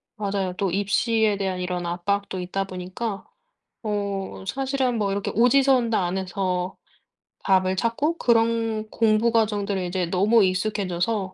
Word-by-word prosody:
맞아요. 195 -3 -2
또 195 - 0
입시에 205 +3 +1
대한 190 -2 -2
이런 180 -1 -3
압박도 190 +2 -2
있다 190 +2 -2
보니까 185 +3 -5 0.6
어 200 -3 -3
사실은 265 +1 0
뭐 200 -2 0
이렇게 200 0 -2
오지선다 245 -3 +3
안에서 185 0 -2 0.7
답을 185 -1 +3
찾고 280 - 0
그런 225 -3 +1
공부 225 +1 +2
과정들을 205 -4 +1
이제 180 0 -1
너무 200 +6 +4
익숙해져서 190 0 -1
200 Hz, 290 characters per minute, -24 LUFS, 185-225 Hz, 0.7 s, 너무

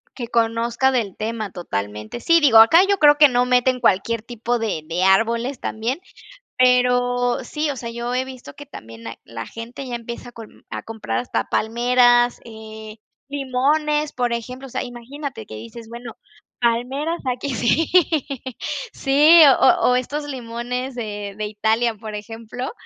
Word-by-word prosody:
Que 240 -3 -5
conozca 235 +2 +1
del 225 -7 -1
tema 215 -2 -4
totalmente. 105 - -5
Sí, 335 +7 +4
digo, 275 -8 +5
acá 310 +10 +7
yo 400 - +2
creo 295 -3 +6
que 295 -1 +7
no 245 0 +2
meten 250 0 +2
cualquier 230 0 +1
tipo 240 0 -3
de 215 -8 -2
de 175 +2 -1
árboles 230 +7 +2
también, 230 +8 -3 0.6
pero 245 -1 +2
sí, 300 +5 -3
o - - -6
sea, 235 -2 -6
yo 235 +1 -4
he 255 +1 0
visto 260 -1 -11
que 290 +1 -11
también 115 - -11
hay 115 - -7
la 115 -1 -7
gente 235 +4 -8
ya 245 - -4
empieza 235 +1 -8
con 225 -2 -14
a - - -6
comprar 215 - -4
hasta 115 -2 -2
palmeras, 240 +1 +3
eh, 220 -1 -10 0.3
limones, 290 +2 0
por 245 -1 -1
ejemplo, 250 +3 -6
o - - -14
sea, - - -3
imagínate 245 - -8
que 110 - -10
dices: 115 - -10
"Bueno, 235 0 -9 0.4
palmeras, 255 +8 -1
aquí". 255 +2 -4
Sí, 250 +8 +1 1.1
sí, 300 +5 +6 0.2
o - - +4
o - - +3
estos 290 +4 -2
limones 250 0 -5
de 205 -4 -5
de 215 - -3
Italia, 220 +2 0
por 215 0 -8
ejemplo, 225 +4 -7
240 Hz, 160 wpm, -21 LUFS, 220-260 Hz, 1.1 s, acá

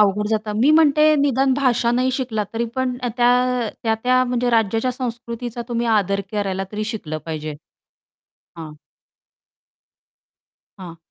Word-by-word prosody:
अवघड 210 0 +3
जातं. 215 -1 -1
मी 280 +5 +5
म्हणते 310 -1 +5
निदान 270 -1 +2
भाषा 245 -3 +1
नाही 255 +1 +1
शिकला 235 -5 -2
तरी 230 +1 -1
पण 255 -1 -1 0.2
त्या, 240 -1 +4 0.4
अ, - - -3
त्या-त्या 245 +3 +2
म्हणजे 245 0 0
राज्याच्या 225 +2 +1
संस्कृतीचा 240 -1 -5
तुम्ही 235 0 -1
आदर 200 -3 +1
करायला 195 -2 -2
तरी 215 +1 -3
शिकलं 200 -9 -5
पाहिजे. 155 -1 -5 1.0
हां. 155 -2 -8 2.1
हां. 175 -3 -9
235 Hz, 130 wpm, -21 LUFS, 210-255 Hz, 2.1 s, मी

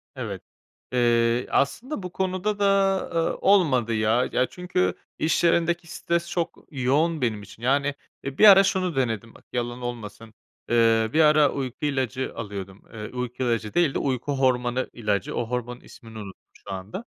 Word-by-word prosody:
Evet, - - -5 0.5
eee, 120 0 +2
aslında 230 - -1
bu 180 - -6
konuda 190 +3 -2
da, 195 -1 +3
eee, 165 -1 0
olmadı, 140 - +3
ya. 110 +3 +2
Ya, 125 - +2
çünkü 175 - -1 0.3
iş 160 - +1
yerindeki 170 0 +2
stres 170 0 -2
çok 170 -2 -3
yoğun 150 +4 +1
benim 110 -4 -1
için. 110 +3 -14
Yani, 140 +2 +1 0.3
eee, 135 0 -5
bir 215 - +8
ara 195 0 +9
şunu 185 -4 0
denedim, 115 -4 -2
bak, - - -18
yalan 120 0 -3
olmasın. 115 -2 -7 0.4
Eee, 115 -1 +3
bir 155 - +2
ara 150 -1 +5
uyku 135 0 -4
ilacı 130 -3 -1
alıyordum. 100 -1 -7
Eee, 105 -1 -6
uyku 125 0 -4
ilacı 115 -3 -1
değil 170 -5 +2
de - - -1
uyku 135 +1 -1
hormonu 130 -1 +1
ilacı. 105 -4 -2
O 120 - -1
hormonun 125 0 -4
ismini 115 -2 -13
unuttum 100 -3 -9 0.3
şu - - -5
anda. 95 - -7
130 Hz, 165 wpm, -25 LUFS, 115-165 Hz, 0.5 s, ara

